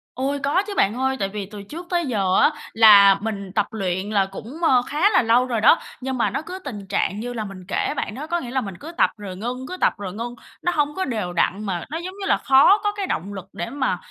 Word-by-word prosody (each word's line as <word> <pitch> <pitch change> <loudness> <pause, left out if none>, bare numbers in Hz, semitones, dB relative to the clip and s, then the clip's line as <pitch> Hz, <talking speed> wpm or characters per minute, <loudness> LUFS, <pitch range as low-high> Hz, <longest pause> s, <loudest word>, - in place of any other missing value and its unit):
Ôi, 275 +3 -1
có 295 +8 +2
chứ 410 - -4
bạn 200 - +3
ơi. 265 +1 0
Tại 195 - -1
vì 205 0 -5
từ 205 +1 -10
trước 325 - -9
tới 345 -2 0
giờ 195 -8 0
á - - +5 0.2
là 205 -3 +8
mình 200 -3 -4
tập 210 - +2
luyện 190 -2 -2
là 200 -2 +2
cũng, 225 - -9
ờ, 260 -6 +5
khá 310 +8 +2
là 425 - +4
lâu 235 +1 +3
rồi 235 -4 -2
đó, 270 +8 +6 0.2
nhưng 260 0 -3
mà 235 - +2
nó - - -3
cứ 360 +4 -8
tình 210 - -8
trạng 195 +2 -1
như 245 +2 -4
là 225 -2 -3
mình 195 -2 -10
kể - - -1
bạn 210 - -3
đó, 295 +4 -6
có 345 +1 0
nghĩa 245 -6 -7
là 260 0 0
mình 195 -5 -7
cứ 320 - -8
tập - - +4
rồi 200 -3 -7
ngưng, 250 +5 -5
cứ 365 - -6
tập - - +2
rồi 195 -3 -6
ngưng, 235 +3 -5 0.3
nó 355 - +1
hông 295 -1 0
có 380 - -1
đều 210 -8 -3
đặn, 195 +4 0
mà 180 -4 -3
nó, 315 - -3
giống 360 +3 -6
như - - -3
là, - - +3
khó 275 +9 +5
có 415 - +1
cái 405 -2 -4
động 200 - -3
lực 190 -2 -7
để 175 - -4
mà, 260 -7 -1
235 Hz, 275 wpm, -22 LUFS, 200-290 Hz, 0.3 s, là